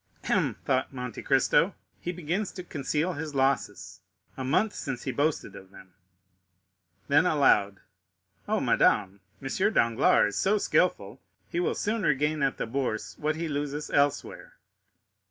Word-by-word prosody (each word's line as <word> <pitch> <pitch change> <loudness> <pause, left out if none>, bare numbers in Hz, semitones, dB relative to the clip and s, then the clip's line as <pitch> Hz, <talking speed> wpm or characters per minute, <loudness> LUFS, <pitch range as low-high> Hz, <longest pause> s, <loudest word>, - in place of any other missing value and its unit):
"Hem," - - +1
thought 130 -1 0
Monte 125 -4 -6
Cristo, - - +2 0.2
"he 175 - -4
begins 180 +4 -3
to 180 - -7
conceal 155 +2 -2
his 150 -1 -6
losses; 135 0 -1 0.4
a 130 - -5
month 185 +11 +1
since 130 -3 -5
he 130 - -2
boasted 145 -6 -1
of 95 -1 -12
them." 95 -1 -16 1.1
Then 150 +5 +4
aloud,—"Oh, 105 - -1
madame, 100 -1 +2 0.2
M. 190 +11 0
Danglars 115 -3 +3
is 100 - -1
so 205 +2 +3
skilful, 135 - 0 0.3
he 170 - -2
will 175 - 0
soon 220 +2 -1
regain 150 -1 +1
at 135 -1 +1
the - - -2
Bourse 115 -3 -3
what 155 +1 0
he 165 +1 -3
loses 145 0 -4
elsewhere." 145 0 -1
145 Hz, 140 wpm, -27 LUFS, 125-160 Hz, 1.1 s, Then